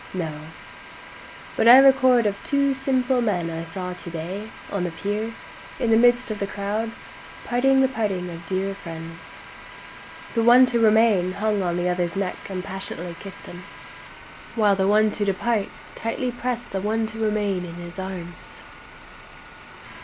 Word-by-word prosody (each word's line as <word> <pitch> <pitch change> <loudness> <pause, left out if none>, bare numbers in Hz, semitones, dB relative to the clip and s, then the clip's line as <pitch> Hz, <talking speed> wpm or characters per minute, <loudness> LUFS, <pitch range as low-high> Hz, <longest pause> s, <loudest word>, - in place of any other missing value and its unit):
—No; 165 -4 -2 1.2
But - - +2
I 245 +2 +11
record 260 -3 +5
of 205 -1 +1
two 280 -1 +1
simple 260 -1 0
men 180 -7 -1
I 165 0 -4
saw 180 +2 -5
to 180 - -8
day, 180 +6 -6 0.2
on 200 -3 -1
the 175 - -1
pier, 205 +6 -3 0.5
in 235 -3 +1
the - - +6
midst 240 0 +4
of 210 - -4
the 200 - -2
crowd, 205 +3 -3 0.6
parting 265 +2 +3
the 265 - +4
parting 205 -8 -2
of 165 0 -10
dear 195 +1 -1
friends; 165 -3 -9 1.1
The 230 - +1
one 240 +3 +7
to 235 - +3
remain 215 -5 +4
hung 210 0 0
on 175 -2 -1
the 175 0 0
other's 175 -1 -1
neck, 195 0 -4
and 185 -2 -4
passionately 190 -3 -6
kiss'd 195 -1 -10
him, 180 - -9 0.9
While 210 -3 +3
the 190 0 +1
one 215 +1 +4
to 210 - -2
depart, 200 +2 0 0.3
tightly 245 +2 -3
prest 245 0 -4
the 195 - -2
one 220 +2 0
to 220 0 -8
remain 210 -4 0
in 170 -1 -8
his 175 +1 -9
arms. 180 -2 -8
205 Hz, 160 wpm, -23 LUFS, 180-230 Hz, 1.2 s, I